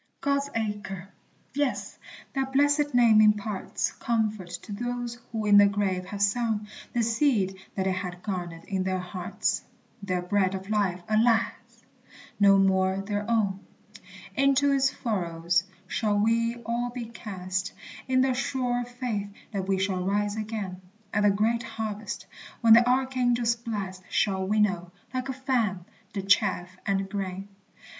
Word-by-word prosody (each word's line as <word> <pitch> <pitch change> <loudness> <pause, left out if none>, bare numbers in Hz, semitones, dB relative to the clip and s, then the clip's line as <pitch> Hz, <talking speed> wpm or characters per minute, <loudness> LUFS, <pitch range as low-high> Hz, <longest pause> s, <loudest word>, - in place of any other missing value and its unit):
God's 280 0 0
Acre! 205 -4 -3 0.4
Yes, 285 -1 -1 0.3
that 270 -1 -2
blessed 290 0 +3
name 230 -3 +7
imparts 210 -1 +1
Comfort 215 -5 -1
to - - -10
those 240 +2 -3
who 220 -2 -2
in 205 -1 +7
the 205 - +8
grave 195 -2 0
have 200 +2 -2
sown 215 0 +1 0.3
The 240 - +1
seed 225 -5 +1 0.2
that 190 - 0
they 190 - +2
had 180 -1 -4
garnered 175 -4 -4
in 190 -2 -2
their 185 0 0
hearts, 180 0 -2 0.4
Their 185 -3 -1
bread 190 +1 +1
of 190 +2 -6
life, 190 -4 +1
alas! 225 +1 +3 0.9
no 200 -1 +7
more 190 -1 +3
their 205 +1 -2
own. 205 -4 +1 0.8
Into 275 +1 +4
its 270 -1 +3
furrows 170 -7 0 0.2
shall 210 +2 0
we 230 +2 +2
all 240 +1 -1
be 240 -1 -5
cast, 190 -4 -4 0.4
In 255 0 +3
the 260 0 +3
sure 250 -2 -1
faith 240 -4 -3 0.2
that 195 -3 -3
we 195 -1 +2
shall 190 -1 0
rise 205 +2 0
again 210 -4 -4 0.3
At 210 - +2
the 205 - +5
great 220 +4 +2
harvest, 220 -2 -5 0.4
when 230 -2 +8
the 240 +2 +7
archangel's 250 -2 +2
blast 205 -6 -5
Shall 190 -2 +1
winnow, 190 -4 +1 0.2
like 255 +1 -2
a - - -1
fan, 240 -9 0 0.3
the 195 -2 -4
chaff 185 -2 +2
and 195 -1 +1
grain. 195 -1 -4
210 Hz, 145 wpm, -27 LUFS, 190-235 Hz, 0.9 s, the